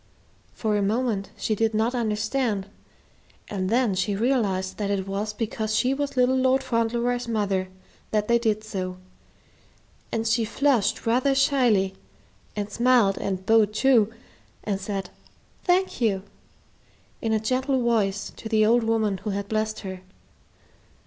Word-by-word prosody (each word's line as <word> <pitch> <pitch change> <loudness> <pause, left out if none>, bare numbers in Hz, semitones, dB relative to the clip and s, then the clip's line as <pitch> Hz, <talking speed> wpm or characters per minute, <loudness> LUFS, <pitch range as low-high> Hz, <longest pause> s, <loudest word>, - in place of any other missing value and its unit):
For 215 -2 0
a 205 - +1
moment 210 -1 0
she 220 - -1
did 220 +1 0
not 225 +3 +1
understand, 220 -2 -1 0.8
and 185 -2 -2
then 235 -2 +2
she 190 +2 0
realized 200 -5 0
that 205 -2 -2
it 195 -1 -1
was 200 +2 -2
because 215 0 -2
she 255 +3 +2
was 280 -1 -3
little 250 +1 +4
Lord 260 +1 +2
Fauntleroy's 240 0 0
mother 200 -4 0 0.4
that 210 -1 0
they 235 0 +4
did 215 -2 0
so, 185 -4 -4 1.1
and 225 0 -1
she 230 +1 +2
flushed 245 0 +1
rather 255 +4 +2
shyly 245 -9 +3 0.6
and 205 0 -3
smiled 235 -4 +3
and 190 -1 -3
bowed 215 -1 +4
too, 230 -4 +4 0.5
and 200 -2 -2
said, 195 -2 -4 0.5
"Thank 365 -5 +1
you," 195 -5 +1 1.0
in 225 - -1
a 220 - +2
gentle 255 +4 0
voice 205 -4 0
to 220 - -7
the 215 -1 +4
old 235 +2 +4
woman 220 -3 +1
who 210 - -5
had 200 0 -3
blessed 215 0 -2
her. 190 -2 -7
220 Hz, 145 wpm, -25 LUFS, 200-245 Hz, 1.1 s, little